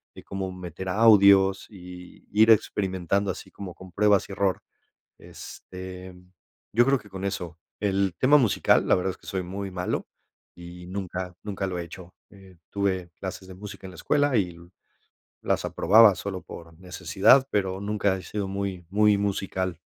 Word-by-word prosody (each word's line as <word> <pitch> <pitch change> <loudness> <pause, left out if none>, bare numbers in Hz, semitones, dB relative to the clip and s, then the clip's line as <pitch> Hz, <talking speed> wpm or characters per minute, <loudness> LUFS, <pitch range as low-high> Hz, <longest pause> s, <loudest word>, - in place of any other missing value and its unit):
de - - -12
cómo 95 -1 -5
meter 90 0 -8
audios 100 -2 +5
y 90 -2 -12
ir 110 +2 +4
experimentando 95 -2 +1
así - - -10
como 95 -3 -9
con 95 -1 -13
pruebas 105 +1 +3
y - - -8
error, 95 -1 0 0.6
este, 95 0 -10 0.6
yo 120 +3 +5
creo 135 +1 +3
que 105 - -17
con 95 0 -6
eso, 85 -4 -5 0.2
el 95 -2 0
tema 140 +3 +5
musical, 120 -8 +2
la - - +5
verdad 95 +1 -1
es 95 - -12
que - - -19
soy 95 -1 -3
muy 95 +2 -5
malo 90 0 -3 0.5
y 85 0 -11
nunca 90 -1 -5
nunca 100 -2 -3
lo 90 -1 -4
he - - -3
hecho, 85 +2 -12 0.2
eh, 95 -2 -17
tuve 95 -3 -1
clases 95 0 -7
de 95 - -10
música 100 0 -10
en - - -10
la - - -13
escuela 145 +2 +1
y 90 -5 -1 0.8
las - - -1
aprobaba 110 -1 +5
solo 95 0 -5
por 85 -1 -12
necesidad, 95 +7 +3
pero 95 -2 -1
nunca 100 -1 0
he 95 - -10
sido 105 -2 -4
muy 95 -2 -4
muy 105 +1 +3
musical. 95 -3 -2
95 Hz, 170 wpm, -25 LUFS, 90-100 Hz, 0.8 s, audios